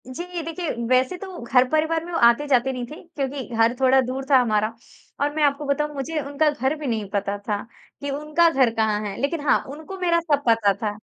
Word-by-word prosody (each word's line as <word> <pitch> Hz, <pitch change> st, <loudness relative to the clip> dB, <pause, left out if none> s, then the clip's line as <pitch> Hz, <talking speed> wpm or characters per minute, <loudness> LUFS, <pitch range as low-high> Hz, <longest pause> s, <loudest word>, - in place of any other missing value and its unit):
जी, 345 Hz, +6 st, -5 dB
देखिए 330 Hz, +1 st, -4 dB, 0.2 s
वैसे 255 Hz, +7 st, +2 dB
तो 375 Hz, -1 st, -8 dB
घर-परिवार 310 Hz, +7 st, +2 dB
में 350 Hz, -, -8 dB
वो 335 Hz, -, -1 dB
आते-जाते 265 Hz, +1 st, +2 dB
नहीं 250 Hz, -2 st, -4 dB
थे -, -, -7 dB, 0.2 s
क्योंकि 275 Hz, -1 st, -3 dB
घर 225 Hz, +1 st, +3 dB
थोड़ा 265 Hz, 0 st, +5 dB
दूर 260 Hz, +1 st, -4 dB
था 275 Hz, -, +7 dB
हमारा 215 Hz, -2 st, +1 dB, 0.5 s
और 290 Hz, +1 st, +1 dB
मैं 310 Hz, -, +1 dB
आपको 285 Hz, 0 st, +1 dB
बताऊँ 295 Hz, +1 st, -1 dB
मुझे 295 Hz, +4 st, -3 dB
उनका 285 Hz, +2 st, +1 dB
घर 275 Hz, 0 st, -1 dB
भी 300 Hz, -2 st, -6 dB
नहीं 220 Hz, -4 st, -2 dB
पता 200 Hz, 0 st, -2 dB
था, 205 Hz, 0 st, -3 dB, 0.4 s
कि 285 Hz, -, -3 dB
उनका 300 Hz, +4 st, +2 dB
घर 265 Hz, -6 st, +3 dB
कहाँ 220 Hz, -1 st, +1 dB
है 200 Hz, -, -4 dB
लेकिन 290 Hz, +3 st, -1 dB
हाँ, -, -, +5 dB
उनको 315 Hz, +7 st, -8 dB
मेरा 340 Hz, -2 st, +2 dB
सब 295 Hz, -4 st, 0 dB
पता 225 Hz, -3 st, +4 dB
था 205 Hz, +1 st, -4 dB
275 Hz, 210 wpm, -23 LUFS, 235-310 Hz, 0.5 s, था